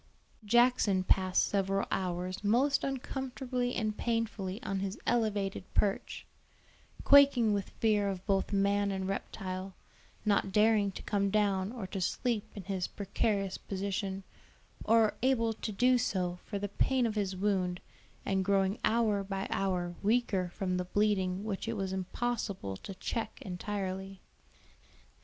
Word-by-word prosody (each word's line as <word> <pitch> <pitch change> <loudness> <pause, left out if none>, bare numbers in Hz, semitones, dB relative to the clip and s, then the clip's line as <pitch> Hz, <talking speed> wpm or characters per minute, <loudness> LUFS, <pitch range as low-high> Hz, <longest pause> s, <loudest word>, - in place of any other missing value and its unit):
Jackson 230 -4 +3
passed 185 0 +3
several 195 0 0
hours 185 +1 -2
most 260 +7 +3
uncomfortably 260 -2 -3
and 215 -1 -1
painfully 225 -4 -1
on 195 0 -2
his 195 +1 -3
elevated 210 -5 0
perch, 200 -2 0 0.8
quaking 275 -6 +6
with 200 -2 -2
fear 210 -3 +1
of 190 -1 -5
both 195 -1 +1
man 200 0 +2
and 190 -1 -2
reptile, 190 -1 -4 0.5
not 200 -2 +2
daring 210 -1 +4
to - - -9
come 200 -1 +1
down 200 -1 +1
or 235 -5 -5
to 190 +1 -5
sleep 225 +3 0
in 200 - -6
his 190 -2 -2
precarious 200 -1 -1
position, 195 0 -3 0.6
or 225 -1 +4
able 230 -3 +2
to 215 - -5
do 250 +4 +3
so 180 -5 -1
for 205 - -4
the 205 +1 -2
pain 255 +5 +1
of 225 - 0
his 200 -3 -1
wound, 185 -2 0 0.5
and 190 -1 +1
growing 195 +1 +1
hour 215 -3 +2
by 195 0 -3
hour 180 -3 -1
weaker 205 -4 +1
from 185 0 -2
the 180 - -2
bleeding 190 -1 +1
which 215 0 -3
it 230 - -1
was 190 -1 -2
impossible 190 - -3
to 190 - -8
check 220 +3 -4
entirely. 190 0 -4
200 Hz, 140 wpm, -31 LUFS, 190-225 Hz, 0.8 s, quaking